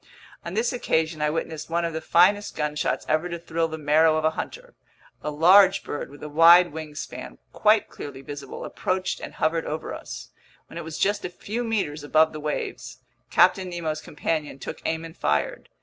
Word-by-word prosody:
On 170 Hz, +2 st, -6 dB
this 235 Hz, +3 st, +1 dB
occasion 160 Hz, -9 st, 0 dB
I 150 Hz, -, +2 dB
witnessed 160 Hz, 0 st, -4 dB
one 170 Hz, +1 st, 0 dB
of 165 Hz, -, -3 dB
the 160 Hz, -, -3 dB
finest 195 Hz, +6 st, +3 dB
gunshots 150 Hz, 0 st, -1 dB
ever 155 Hz, +3 st, +1 dB
to 170 Hz, -, -4 dB
thrill 165 Hz, -1 st, -1 dB
the 160 Hz, 0 st, -6 dB
marrow 155 Hz, +1 st, +4 dB
of 155 Hz, -, -1 dB
a 160 Hz, -, +4 dB
hunter. -, -, -7 dB, 0.5 s
A -, -, -3 dB
large 180 Hz, +6 st, +6 dB
bird 145 Hz, -, -5 dB
with 145 Hz, +1 st, -13 dB
a -, -, -4 dB
wide 165 Hz, +2 st, +7 dB
wingspan, 155 Hz, -2 st, -7 dB, 0.2 s
quite 215 Hz, 0 st, +3 dB
clearly 135 Hz, -2 st, -9 dB
visible, 140 Hz, -1 st, -7 dB
approached 185 Hz, 0 st, -2 dB
and -, -, -8 dB
hovered 160 Hz, +1 st, 0 dB
over 155 Hz, +1 st, -4 dB
us. -, -, -8 dB, 0.4 s
When -, -, -9 dB
it -, -, -6 dB
was 155 Hz, -1 st, -6 dB
just 205 Hz, +1 st, +1 dB
a -, -, -3 dB
few 215 Hz, +6 st, -4 dB
meters 195 Hz, -10 st, -2 dB
above 155 Hz, +2 st, +3 dB
the 155 Hz, -, -6 dB
waves, 150 Hz, 0 st, -4 dB, 0.3 s
Captain 185 Hz, -1 st, +4 dB
Nemo's 160 Hz, -3 st, -3 dB
companion 155 Hz, -2 st, -3 dB
took -, -, -7 dB
aim 160 Hz, 0 st, -1 dB
and 165 Hz, -, -11 dB
fired. 75 Hz, 0 st, -1 dB
160 Hz, 190 wpm, -25 LUFS, 150-180 Hz, 0.5 s, wide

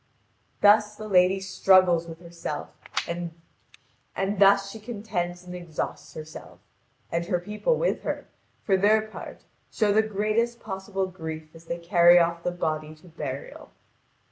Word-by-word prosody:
Thus 210 Hz, 0 st, +5 dB
the 215 Hz, 0 st, -8 dB
lady 185 Hz, -1 st, +4 dB
struggles 185 Hz, -2 st, +4 dB
with 165 Hz, 0 st, -10 dB
herself, 170 Hz, -1 st, -6 dB, 0.4 s
and 170 Hz, 0 st, -4 dB, 1.1 s
thus 195 Hz, 0 st, +5 dB
she 220 Hz, -, -9 dB
contends 200 Hz, -6 st, -4 dB
and 180 Hz, 0 st, -9 dB
exhausts 175 Hz, -3 st, -5 dB
herself. 155 Hz, 0 st, -10 dB, 0.5 s
And 170 Hz, 0 st, -1 dB
her 180 Hz, -, +1 dB
people 210 Hz, -, 0 dB
with -, -, 0 dB
her, -, -, -4 dB, 0.4 s
for 195 Hz, -2 st, +3 dB
their 215 Hz, +3 st, +4 dB
part, 215 Hz, 0 st, -10 dB, 0.3 s
show 210 Hz, -3 st, +2 dB
the 215 Hz, -, +5 dB
greatest 220 Hz, +3 st, 0 dB
possible 195 Hz, -1 st, -3 dB
grief 160 Hz, -4 st, -7 dB
as 165 Hz, 0 st, -15 dB
they 170 Hz, +1 st, -3 dB
carry 175 Hz, 0 st, +6 dB
off 170 Hz, 0 st, +2 dB
the 180 Hz, -, -1 dB
body 155 Hz, -3 st, -3 dB
to 160 Hz, +3 st, -18 dB
burial. 140 Hz, -4 st, -7 dB
180 Hz, 145 wpm, -26 LUFS, 170-210 Hz, 1.1 s, carry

